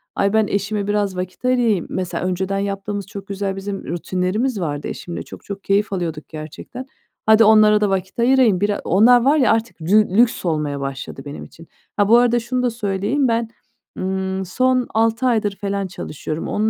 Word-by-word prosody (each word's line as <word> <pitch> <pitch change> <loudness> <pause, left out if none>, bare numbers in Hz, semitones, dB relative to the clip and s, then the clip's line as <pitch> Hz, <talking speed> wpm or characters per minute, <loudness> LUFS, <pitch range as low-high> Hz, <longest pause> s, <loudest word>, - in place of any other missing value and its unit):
ay, 200 +1 +1
ben 220 -2 +3
eşime 200 0 -2
biraz 205 -2 0
vakit 185 +6 -6
ayırayım 240 -7 +2
Mesela, 185 -1 -3
önceden 190 +2 -1
yaptığımız 200 0 -3
çok 200 -2 -9
güzel 195 -1 -3
bizim 195 0 -5
rutinlerimiz 185 +7 -1
vardı 145 -3 -3
eşimle. 175 - -6
Çok - - -12
çok 200 -1 -7
keyif 200 +1 +1
alıyorduk 165 -4 -4
gerçekten. 160 - -8 0.4
Hadi, 220 +1 +6
onlara 215 -1 +6
da 205 - +2
vakit 190 +3 -3
ayırayım. 240 -6 +4
Bira 205 0 0
onlar 235 +6 +5
var 290 +3 +4
ya, 255 -5 +4
artık 225 -4 -1
dü 200 +4 +2
lüks 240 -4 +3
olmaya 150 -3 -1
başladı 135 0 -6
benim 145 - -7
için. 165 0 -14 0.3
Ha, 205 -1 +3
bu 235 - +7
arada 240 0 +3
şunu 250 +2 -2
da 245 - +2
söyleyeyim, 220 +4 -1
ben, 230 -1 0 0.5
ımm, 190 0 -2
son 255 +5 +1
6 225 +2 +1
aydır 215 -5 +1
felan 200 -1 -3
çalışıyorum. 155 -1 -6
Onun 215 +1 0
200 Hz, 180 wpm, -20 LUFS, 185-225 Hz, 0.5 s, bu